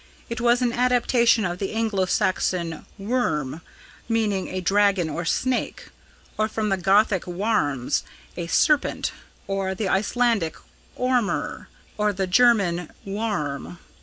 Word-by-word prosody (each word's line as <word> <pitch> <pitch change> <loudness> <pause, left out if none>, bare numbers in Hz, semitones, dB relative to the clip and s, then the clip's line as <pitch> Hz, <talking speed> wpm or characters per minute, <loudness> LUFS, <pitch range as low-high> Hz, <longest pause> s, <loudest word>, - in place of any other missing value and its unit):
It 235 0 -3
was 240 +1 +3
an 240 -1 +1
adaptation 240 -2 +3
of 175 0 -3
the 195 - -3
Anglo 220 -4 0
Saxon 180 -4 -1
'wyrm,' 195 - -1 0.5
meaning 215 -4 0
a 185 - -4
dragon 195 -2 +2
or 170 +3 -4
snake; 255 +8 -1 0.5
or 215 - +3
from 215 -1 -2
the 195 - +1
Gothic 195 +1 +3
'waurms,' 175 - 0 0.3
a 170 -1 -4
serpent; 295 - +2 0.3
or 195 -1 -2
the 200 +1 -2
Icelandic 210 -3 +1 0.4
'ormur,' 250 -4 -1 0.3
or 210 0 +2
the 190 0 -1
German 185 -5 +3 0.2
'wurm.' 195 -8 -3
200 Hz, 125 wpm, -24 LUFS, 180-230 Hz, 0.5 s, was